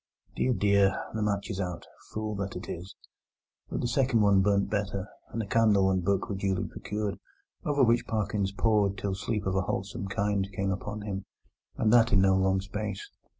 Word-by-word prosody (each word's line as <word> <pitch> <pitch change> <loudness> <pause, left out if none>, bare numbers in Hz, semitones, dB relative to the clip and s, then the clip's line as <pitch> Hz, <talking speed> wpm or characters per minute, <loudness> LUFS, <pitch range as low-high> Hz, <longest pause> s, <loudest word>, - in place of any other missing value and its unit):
Dear, 130 - +2
dear! 100 -3 +3
the 110 - -2
match 105 +1 -1
is 100 -1 -3
out! 90 -2 -4 0.2
Fool 110 0 -3
that 100 -1 -4
it 90 - -6
is! 90 +3 -7 0.7
But - - -2
the - - 0
second 125 -2 +2
one 100 -2 +5
burnt 100 0 +2
better, 100 -2 -2 0.2
and 115 - -3
a - - -5
candle 100 -3 +4
and 95 -1 0
book 100 +1 +1
were 105 - -3
duly 95 -1 -1
procured, 105 -1 -4 0.5
over 145 -2 +3
which 120 -1 +3
Parkins 105 -2 -1
pored 100 -1 +2
till 100 -1 -2
sleep 105 +1 -2
of 95 - 0
a 95 - +3
wholesome 95 +1 -3
kind 100 0 0
came 95 +1 0
upon 105 +2 -4
him, 100 -2 -4 0.5
and 110 0 +3
that 115 -1 +6
in 100 - +5
no 95 0 +4
long 95 0 +2
space. 100 0 -5
100 Hz, 195 wpm, -29 LUFS, 95-110 Hz, 0.7 s, that